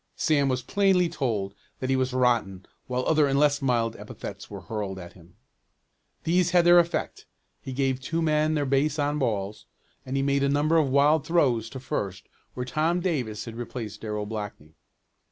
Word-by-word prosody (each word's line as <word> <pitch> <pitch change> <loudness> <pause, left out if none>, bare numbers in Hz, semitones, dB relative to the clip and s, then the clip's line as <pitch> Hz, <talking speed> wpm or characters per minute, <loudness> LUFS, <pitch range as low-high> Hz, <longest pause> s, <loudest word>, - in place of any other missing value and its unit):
Sam 145 -4 +2
was 130 -1 -1
plainly 190 - +2
told 110 - -2 0.2
that 130 0 -2
he - - +3
was 130 0 0
"rotten" 120 -7 +1 0.2
while 125 0 -2
other 155 -2 +3
and 135 0 +1
less 145 0 +3
mild 120 -4 +1
epithets - - -8
were - - -8
hurled 105 -3 -4
at 85 -2 -9
him. 85 0 -19 0.9
These 175 +1 +2
had 175 0 +4
their 175 0 +8
effect. 170 0 -2 0.3
He 135 - -7
gave 130 0 0
two 165 +5 -2
men 155 -1 +2
their 145 -1 0
base 140 +3 +1
on 145 0 0
balls, 105 -5 -2 0.4
and 130 +1 -3
he 135 - +1
made 140 0 +1
a 140 - +2
number 150 +3 +2
of 150 -4 +3
wild 140 +3 +4
throws 125 -10 +2
to 130 - -7
first 100 -7 -4 0.3
where 125 - -3
Tom 160 +7 0
Davis 130 - -2
had 115 -1 -8
replaced 120 -2 -6
Darrell 105 -1 -3
Blackney. 105 -8 -7
135 Hz, 185 wpm, -26 LUFS, 115-155 Hz, 0.9 s, their